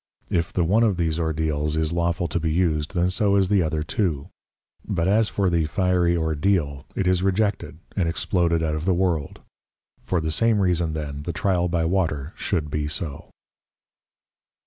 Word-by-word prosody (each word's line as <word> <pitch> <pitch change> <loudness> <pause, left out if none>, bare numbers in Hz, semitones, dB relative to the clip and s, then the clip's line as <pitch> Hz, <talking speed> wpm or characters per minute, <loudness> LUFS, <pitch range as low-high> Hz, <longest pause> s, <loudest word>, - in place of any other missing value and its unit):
If 85 -1 0
the 90 - +1
one 100 +7 +3
of 105 -6 +2
these 80 -2 0
Ordeals 80 -1 -1
is 80 +1 0
lawful 85 0 0
to 85 - -1
be 80 -1 -1
used, 80 0 0
then 90 +1 +2
so 100 0 +2
is 95 -2 +3
the 100 -2 +3
other 80 -2 -1
too: 80 - -2 0.5
But 85 +1 -1
as 110 +2 +3
for 100 -2 0
the 85 -3 +2
fiery 90 0 +1
Ordeal 80 -3 0
it 95 - -1
is 90 -1 +2
rejected 95 -4 0 0.2
and 90 -5 +1
exploded 85 -1 +1
out 80 -1 0
of 80 +1 -3
the 95 -2 +2
World; 85 -5 -1 0.6
for 90 - -1
the 80 -1 -2
same 110 +6 +2
reason 85 -4 +1
then 75 -2 -5
the 85 +3 -4
tryal 90 0 +1
by 85 -1 0
Water 80 -4 -1
should 75 -3 -2
be 75 -1 -1
so. 75 -1 -4
85 Hz, 180 wpm, -24 LUFS, 80-95 Hz, 0.6 s, one